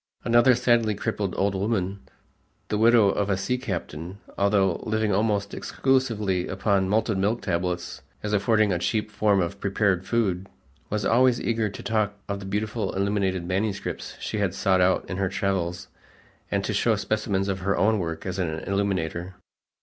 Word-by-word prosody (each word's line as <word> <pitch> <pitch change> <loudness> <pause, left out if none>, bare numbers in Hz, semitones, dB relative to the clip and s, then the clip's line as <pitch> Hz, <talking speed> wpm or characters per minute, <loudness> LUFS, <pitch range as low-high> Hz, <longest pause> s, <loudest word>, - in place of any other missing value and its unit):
Another 120 +2 +5
sadly 120 -3 +2
crippled 105 -3 -2
old 100 0 +1
woman, 100 -1 -1 0.7
the 105 - 0
widow 115 -2 +6
of 100 +1 0
a 95 - +2
sea 125 +6 -1
captain, 90 - -5 0.2
although 100 -3 +2
living 110 -1 0
almost 100 0 0
exclusively 110 -9 0
upon 95 0 +1
malted 110 -1 +1
milk 105 +5 0
tablets 90 -1 -2 0.2
as 105 0 -2
affording 105 0 +3
a 85 - -1
cheap 105 +4 -1
form 105 -2 +2
of 85 -2 -2
prepared 95 -2 0
food, 95 -5 0 0.4
was 105 -1 -1
always 125 +1 +4
eager 115 -2 0
to 100 - -9
talk 105 -2 0
of 100 -1 -3
the 95 - -8
beautiful 105 +3 -2
illuminated 95 -2 0
manuscripts 100 +2 -3
she 105 - -3
had 100 -2 0
sought 95 -2 +2
out 90 +1 +2
in 90 - -4
her 95 -1 0
travels 90 -2 -2 0.6
and - - 0
to - - -2
show - - +2
specimens 100 -3 -1
of 95 -1 -1
her 100 +2 0
own 110 +1 +3
work 80 -2 -4
as 95 0 -3
an 90 -3 0
illuminator. 95 -3 -2
100 Hz, 165 wpm, -25 LUFS, 95-110 Hz, 0.7 s, widow